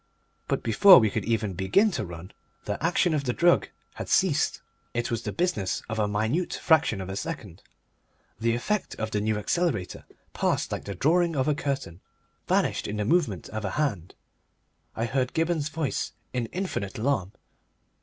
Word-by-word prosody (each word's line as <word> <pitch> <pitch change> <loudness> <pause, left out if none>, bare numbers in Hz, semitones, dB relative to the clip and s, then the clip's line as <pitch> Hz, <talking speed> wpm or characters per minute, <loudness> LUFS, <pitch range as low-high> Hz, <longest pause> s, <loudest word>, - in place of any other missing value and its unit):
But - - -1
before 180 - +8
we 110 -3 +3
could 110 -1 -2
even 110 -3 0
begin 95 - +3
to 120 - -2
run 85 +1 -9 0.3
the - - -3
action 175 0 +2
of 145 -2 -1
the 125 - 0
drug 175 +4 +3 0.2
had - - -7
ceased. 175 -8 +2 0.3
It 120 0 -1
was 115 - -1
the - - -4
business 170 - -1
of 110 0 -2
a 105 - +2
minute 110 - -1
fraction 160 - +2
of 95 - -6
a 95 - -5
second. 100 - -6 0.8
The 115 0 +1
effect 210 - -2
of 110 0 -4
the 105 - 0
New 110 0 0
Accelerator 110 - -1 0.3
passed - - 0
like - - -4
the 100 - -5
drawing 165 - +2
of 130 0 +1
a 150 - +3
curtain, 140 - -3 0.5
vanished - - +1
in 105 - -4
the 105 - -1
movement 120 - +1
of 110 0 -5
a 95 - -2
hand. 110 - -1 0.8
I 115 - -1
heard 130 +1 -1
Gibberne's 160 -2 0
voice 155 -3 -2 0.2
in 125 -2 -1
infinite 175 - -4
alarm. 110 -5 0
120 Hz, 175 wpm, -27 LUFS, 105-160 Hz, 0.8 s, before